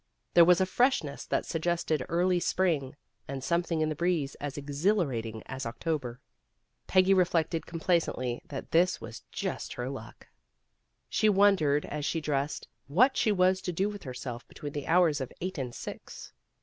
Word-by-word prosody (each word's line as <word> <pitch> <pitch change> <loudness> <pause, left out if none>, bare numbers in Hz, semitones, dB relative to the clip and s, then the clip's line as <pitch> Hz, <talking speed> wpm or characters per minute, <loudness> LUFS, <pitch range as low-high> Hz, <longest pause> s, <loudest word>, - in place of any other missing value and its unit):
There 170 - +8
was 180 0 +5
a 190 - +3
freshness 185 - +1
that - - 0
suggested 165 -3 -1
early 180 +1 +2
spring, 165 -7 0 0.3
and 135 -1 -5
something 170 -1 0
in 155 - +1
the 155 - -2
breeze 165 -4 0
as 145 -1 -4
exhilarating 140 - -1
as 135 0 -6
October. 125 0 -3 0.7
Peggy 190 +1 +5
reflected 170 -3 +1
com 165 - -6
placently 130 -8 0
that 135 - -7
this 175 +2 +3
was - - -8
just - - -4
her - - -4
luck. - - -10 0.8
She 215 - +2
wondered, 190 -8 +4
as 150 0 -4
she 165 - 0
dressed, 145 -1 -2 0.2
what 245 - +4
she 215 - +2
was 185 -1 +3
to 180 - -3
do 190 +4 0
with 205 -1 -7
herself 125 -2 -7
between 145 -1 -8
the 145 - -5
hours 165 -4 +4
of 130 - -4
eight 185 -2 -4
and 125 -2 -3
six. - - -9
165 Hz, 165 wpm, -29 LUFS, 140-180 Hz, 0.8 s, There